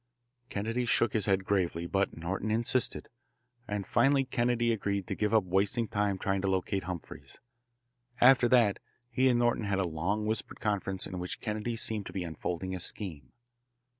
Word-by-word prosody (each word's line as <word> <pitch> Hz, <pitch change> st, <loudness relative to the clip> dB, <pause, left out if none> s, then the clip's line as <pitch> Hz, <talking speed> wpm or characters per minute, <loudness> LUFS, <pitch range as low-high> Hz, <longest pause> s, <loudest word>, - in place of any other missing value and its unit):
Kennedy 115 Hz, +5 st, -2 dB
shook 115 Hz, -2 st, +2 dB
his 110 Hz, -3 st, 0 dB
head 95 Hz, -1 st, +2 dB
gravely, 90 Hz, -4 st, 0 dB
but 95 Hz, +1 st, 0 dB
Norton 95 Hz, +6 st, -3 dB
insisted, 120 Hz, +3 st, 0 dB, 0.6 s
and 105 Hz, -1 st, -3 dB
finally 135 Hz, 0 st, +3 dB
Kennedy 120 Hz, -1 st, +1 dB
agreed 100 Hz, -2 st, -2 dB
to -, -, -3 dB
give 105 Hz, -1 st, 0 dB
up 110 Hz, -3 st, +4 dB
wasting 100 Hz, +5 st, 0 dB
time 105 Hz, -3 st, 0 dB
trying 95 Hz, +1 st, -1 dB
to 100 Hz, -, -1 dB
locate 95 Hz, 0 st, -1 dB
Humphreys. 90 Hz, -2 st, -8 dB, 0.8 s
After 125 Hz, -1 st, +6 dB
that 115 Hz, -5 st, +4 dB, 0.3 s
he 130 Hz, 0 st, +3 dB
and 120 Hz, -, +3 dB
Norton 120 Hz, -2 st, +1 dB
had 100 Hz, -1 st, 0 dB
a 95 Hz, -, +1 dB
long 90 Hz, +7 st, -1 dB
whispered 110 Hz, +1 st, -2 dB
conference 95 Hz, -3 st, -1 dB
in 95 Hz, -, -5 dB
which 90 Hz, 0 st, -4 dB
Kennedy 110 Hz, +1 st, -3 dB
seemed 110 Hz, -2 st, -2 dB
to -, -, -9 dB
be 95 Hz, -, -2 dB
unfolding 85 Hz, +3 st, -4 dB
a 95 Hz, -, -3 dB
scheme. 85 Hz, -4 st, -3 dB
100 Hz, 170 wpm, -30 LUFS, 95-115 Hz, 0.8 s, After